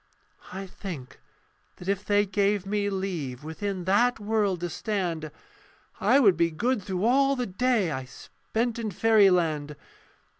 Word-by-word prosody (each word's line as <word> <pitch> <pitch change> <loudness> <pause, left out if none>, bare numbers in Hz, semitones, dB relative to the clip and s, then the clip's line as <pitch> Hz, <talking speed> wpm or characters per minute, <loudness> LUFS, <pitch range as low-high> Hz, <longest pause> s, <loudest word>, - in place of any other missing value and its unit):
I 195 +1 -6
think 165 -9 -8 0.6
that 180 - -11
if 200 0 0
they 205 0 +2
gave 200 0 0
me 205 0 -1
leave 170 -10 -4
Within 185 +4 -4
that 215 +7 +2
world 205 -4 0
to 175 - -2
stand, 175 -8 -2 0.7
I 275 - +4
would 200 -9 +5
be 170 0 +2
good 220 +8 -1
through 185 +1 -2
all 275 +3 +4
the 250 -2 -2
day 215 -2 +1
I 130 -2 -4
spent 230 - -4
in 225 -2 -2
fairyland. 180 -8 +3
195 Hz, 145 wpm, -27 LUFS, 175-215 Hz, 0.7 s, would